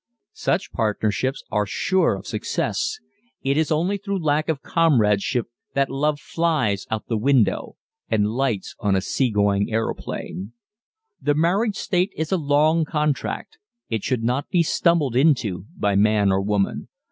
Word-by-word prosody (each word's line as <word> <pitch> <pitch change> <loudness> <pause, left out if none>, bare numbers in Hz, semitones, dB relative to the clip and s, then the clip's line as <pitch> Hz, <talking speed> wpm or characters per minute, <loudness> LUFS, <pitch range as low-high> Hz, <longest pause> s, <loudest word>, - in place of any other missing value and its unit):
Such 185 - -1
partnerships 110 +4 -1
are 105 -1 +1
sure 185 - +1
of 95 - -9
success. - - -2 0.5
It 135 +1 +1
is 160 +1 +1
only 175 +6 +1
through 200 0 -2
lack 150 +1 +1
of 150 -4 -1
comradeship 120 -7 +2 0.3
that 135 -1 +1
love 145 +2 0
flies 155 - 0
out 110 -1 -2
of - - -55
the 115 -2 -1
window 130 -1 +2 0.3
and 105 -2 +2
lights 120 -4 -1
on 105 -4 +1
a 95 - +1
sea 130 +6 0
going 100 -1 +1
aeroplane. 110 -2 -4 0.7
The 145 - +1
marriage 195 +7 +2
state 185 +1 0
is 160 -1 -2
a 190 - +3
long 155 +2 +3
contract 150 - -2 0.3
it 110 -3 -2
should 125 -4 -1
not 125 +4 -1
be 175 -2 +3
stumbled 160 -6 +2
into 120 - +2
by 100 -1 +1
man 100 0 +3
or 95 0 +2
woman. 100 0 -1
135 Hz, 155 wpm, -23 LUFS, 105-160 Hz, 0.7 s, a